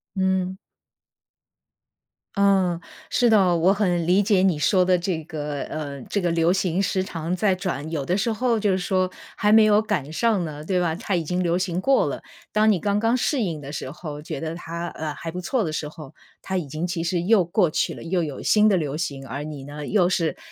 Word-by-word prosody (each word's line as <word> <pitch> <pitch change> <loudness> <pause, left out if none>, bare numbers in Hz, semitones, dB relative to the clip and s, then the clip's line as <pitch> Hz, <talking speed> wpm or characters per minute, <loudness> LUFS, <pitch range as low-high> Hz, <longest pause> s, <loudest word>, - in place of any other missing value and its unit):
嗯。 190 0 0 1.8
嗯， 190 -4 +3 0.3
是 245 - +3
的， 190 -5 +4
我 185 +4 +4
很 180 -5 0
理 190 +3 +4
解 195 -2 +3
你 180 -5 +3
说 185 +3 +3
的 185 0 +4
这 170 -3 -2
个， 150 -3 -4
呃， 145 -3 -5
这 200 - -2
个 175 - +1
流 165 +1 +2
行 190 -1 0
时 190 0 0
常 170 -1 -3
在 190 0 +2
转， 170 -5 -4
有 150 -4 -3
的 180 - +1
时 230 +3 0
候 230 0 +1
就 205 -2 +2
是 185 - +2
说 185 0 0 0.2
还 210 0 +2
没 220 0 +7
有 210 0 +5
赶 160 -9 -2
上 215 -4 +1
呢， 150 -1 -7
对 180 +2 0
吧， 170 -2 +1
它 195 -1 -2
已 170 - 0
经 180 +4 -1
流 175 0 +1
行 185 0 -1
过 270 +3 +3
了。 - - -4 0.3
当 215 +1 +4
你 185 - +1
刚 205 +2 0
刚 230 +3 +2
适 255 +2 0
应 165 -7 -2
的 140 0 -8
时 135 - -5
候， 150 -1 -7
觉 155 -2 -6
得 160 +1 -4
它， 170 0 -5
呃， 155 -1 -5
还 165 - -6
不 180 +1 -5
错 230 +5 0
的 155 -2 -3
时 150 - -3
候， 155 -2 -11 0.3
它 190 - -3
已 170 -6 -1
经 155 +5 -3
其 170 -1 -2
实 175 +1 0
又 200 -1 +4
过 175 0 +2
去 - - 0
了， - - -9
又 175 +1 0
有 145 -4 -5
新 215 0 +4
的 190 - +3
流 150 -3 -2
行。 140 -4 -4
而 140 +5 -5
你 150 -3 -7
呢， 145 +1 -7
又 190 -4 +3
是 170 -3 0
180 Hz, 245 characters per minute, -24 LUFS, 160-195 Hz, 1.8 s, 没